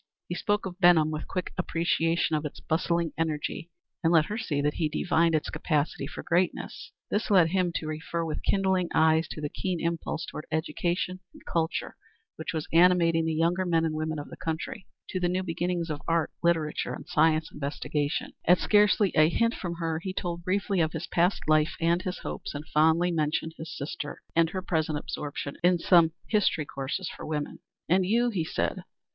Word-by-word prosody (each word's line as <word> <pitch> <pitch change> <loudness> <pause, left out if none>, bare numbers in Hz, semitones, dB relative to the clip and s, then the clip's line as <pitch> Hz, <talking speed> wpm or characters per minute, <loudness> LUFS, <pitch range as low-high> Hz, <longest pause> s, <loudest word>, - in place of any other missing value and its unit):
He - - -3
spoke 205 +4 0
of 185 -1 -6
Benham 170 -4 +5
with 155 0 -4
quick 185 -2 -4
appreciation 165 -1 +1
of 150 - -1
its 150 - -6
bustling 170 0 0
energy, 160 +1 -2 0.3
and 165 - +3
let 160 -3 +5
her 210 - -4
see 155 -11 -1
that 145 +1 +1
he 160 -3 0
divined 165 +1 +2
its 155 - -1
capacity 150 -3 -1
for 155 - -7
greatness. 175 +2 -1 0.2
This 215 +4 0
led 180 -5 +5
him 180 0 +1
to - - -2
refer 160 +2 -3
with 155 - -3
kindling 190 -3 +1
eyes 160 +1 +4
to - - -7
the 150 - -1
keen 180 +3 -3
impulse 165 -1 -2
toward 150 - -8
education 175 +3 -1 0.2
and - - -16
culture 160 -1 -1 0.4
which 160 - -4
was 160 -2 -3
animating 170 -1 +5
the 160 - 0
younger 170 +3 +2
men 165 -2 +2
and 160 - -1
women 155 0 -2
of 145 - -7
the - - -9
country; 170 +7 -4 0.2
to 185 - -2
the 175 -1 +1
new 185 +1 0
beginnings 175 -1 -2
of 145 -1 -4
art, 165 -1 +1
literature, 165 -3 0
and - - -11
scientific 155 0 +2
investigation. 145 +1 -2
At 180 - +6
scarcely 205 -1 +4
a 155 +1 +6
hint 230 +6 +2
from 175 -2 -4
her 165 -1 -2
he 185 +2 -5
told 175 -2 -3
briefly 195 +1 0
of 160 -1 0
his 160 0 -4
past 175 +3 +1
life 155 +1 +3
and 170 +1 +2
his 185 0 -4
hopes, - - -6
and 145 +2 -5
fondly 160 +3 +3
mentioned 160 0 -1
his 160 0 -7
sister 145 +1 -5
and 165 -1 +4
her 185 +1 -4
present 160 -4 0
absorption 145 -1 -5
in 180 0 +5
some 170 -2 +5
history 200 -8 +2
courses 140 +7 -4
for - - -8
women. 150 -1 -3 0.3
"And 185 +3 +3
you?" 235 +6 +2
he 185 -7 -1
said. 160 - -2
165 Hz, 195 wpm, -28 LUFS, 155-180 Hz, 0.4 s, At